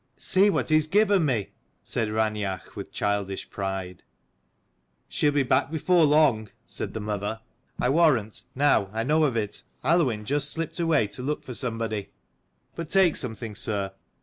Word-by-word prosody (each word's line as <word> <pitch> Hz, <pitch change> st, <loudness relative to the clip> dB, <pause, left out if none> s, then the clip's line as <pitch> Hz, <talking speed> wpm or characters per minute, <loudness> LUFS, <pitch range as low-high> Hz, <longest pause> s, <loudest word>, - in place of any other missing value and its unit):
"See;, 195 Hz, +2 st, +4 dB
what 195 Hz, -, 0 dB
he 155 Hz, -, +4 dB
has 155 Hz, 0 st, +1 dB
given 200 Hz, -1 st, +3 dB
me," 120 Hz, -8 st, -1 dB, 0.3 s
said 110 Hz, -2 st, -2 dB
Raineach 105 Hz, -3 st, -2 dB
with -, -, -7 dB
childish 100 Hz, -2 st, -2 dB
pride. 95 Hz, -2 st, -4 dB, 1.1 s
"She'll 145 Hz, -, +1 dB
be 145 Hz, -1 st, +2 dB
back 130 Hz, +2 st, +2 dB
before 165 Hz, +2 st, +3 dB
long," 145 Hz, -8 st, +3 dB, 0.2 s
said -, -, -6 dB
the -, -, -2 dB
mother. 105 Hz, +1 st, -3 dB, 0.2 s
" 130 Hz, -, -39 dB
I -, -, +1 dB
warrant, 135 Hz, -9 st, +2 dB
now 135 Hz, -8 st, +3 dB
I 115 Hz, +1 st, -1 dB
know 155 Hz, +5 st, +2 dB
of 130 Hz, -5 st, 0 dB
it, 105 Hz, -2 st, -3 dB, 0.2 s
Aluinn 130 Hz, -11 st, +2 dB
just 145 Hz, +3 st, -1 dB
slipped 165 Hz, +3 st, -4 dB
away 165 Hz, -8 st, +3 dB
to 105 Hz, -, -6 dB
look 150 Hz, +4 st, -2 dB
for 125 Hz, -, -7 dB
somebody. 115 Hz, -4 st, -3 dB, 0.6 s
But 165 Hz, -2 st, -6 dB
take 190 Hz, -4 st, +4 dB
something, 110 Hz, -3 st, -4 dB
sir. 100 Hz, -4 st, -3 dB
125 Hz, 165 wpm, -26 LUFS, 105-155 Hz, 1.1 s, See